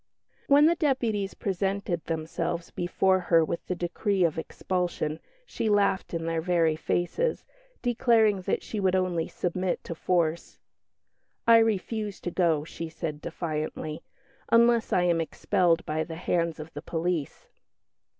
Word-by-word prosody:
When 285 +1 +6
the 330 - +5
deputies 235 - 0
presented 195 -2 -2
themselves 165 +1 -3
before 185 +2 +1
her 165 -2 +3
with 170 - -4
the 180 - -1
decree 180 +2 0
of 160 -1 +1
expulsion, 175 -3 -2 0.3
she 225 - -2
laughed 200 -2 +2
in 165 -1 -3
their 165 -1 -1
very 165 -2 +2
faces, 175 - -1 0.4
declaring 225 -5 +3
that - - -1
she 215 - -4
would 190 -1 +2
only 180 -3 0
submit 180 +1 -2
to - - -5
force. 170 -1 -1 0.9
"I 230 0 +8
refuse 215 -1 -1
to 175 - -3
go," 165 -4 +2
she 165 0 -6
said 160 -2 -5
defiantly, 155 -2 -4 0.5
"unless 235 0 +4
I 180 - +3
am 170 -2 +2
expelled 165 +1 +1
by 155 +1 -1
the 165 - -7
hands 170 -1 -1
of 155 +1 -9
the 145 - -6
police." 165 -2 -3
175 Hz, 140 wpm, -27 LUFS, 165-200 Hz, 0.9 s, I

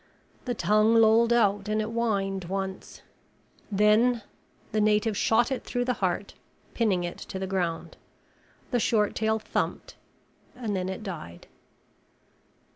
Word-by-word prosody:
The 245 -2 -2
tongue 215 +2 +3
lolled 225 +1 +5
out 205 -3 +2
and 215 0 +1
it - - +1
whined 200 -5 -1
once. 190 +1 -5 0.7
Then 215 +3 +3 0.5
the 215 - +1
native 210 +1 +2
shot 235 +5 +2
it 265 - -2
through 245 -1 -2
the 250 - +1
heart, 185 +2 -1 0.4
pinning 200 -7 +1
it 175 - -5
to 190 - -7
the 190 - -3
ground. 180 -4 -3 0.7
The 245 - +2
short 210 -2 +2
tail 220 0 +1
thumped 220 - -3 0.6
and 225 -5 -3
then 185 0 -2
it 190 +3 -6
died. 160 - -8
210 Hz, 135 wpm, -27 LUFS, 195-230 Hz, 0.7 s, lolled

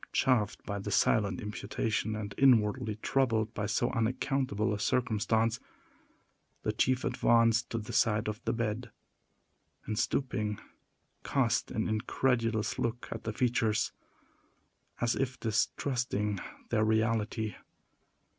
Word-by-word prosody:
Chafed 105 -6 +1
by 100 -1 -3
the 100 - -5
silent 100 -2 +2
imputation, 105 +1 -2
and 105 -1 -5
inwardly 120 -3 +3
troubled 115 -5 +1
by 105 0 -2
so 120 +4 +1
unaccountable 115 -2 0
a 105 - -3
circumstance, 115 -1 +1 1.0
the - - +1
chief 130 0 +1
advanced 115 0 +3
to 115 - -2
the 105 -2 -6
side 105 -2 +2
of 105 +2 -4
the 115 - +1
bed, 115 0 -2 1.0
and, 110 0 -2
stooping, 105 -5 -1 0.6
cast - - +1
an - - -1
incredulous 115 0 0
look 120 +1 -2
at - - -6
the 110 - -1
features, 115 -2 +1 1.1
as 120 0 +2
if 130 -1 -2
distrusting 110 -2 0 0.3
their 110 - +3
reality. 110 -1 +1
110 Hz, 120 wpm, -31 LUFS, 105-120 Hz, 1.1 s, inwardly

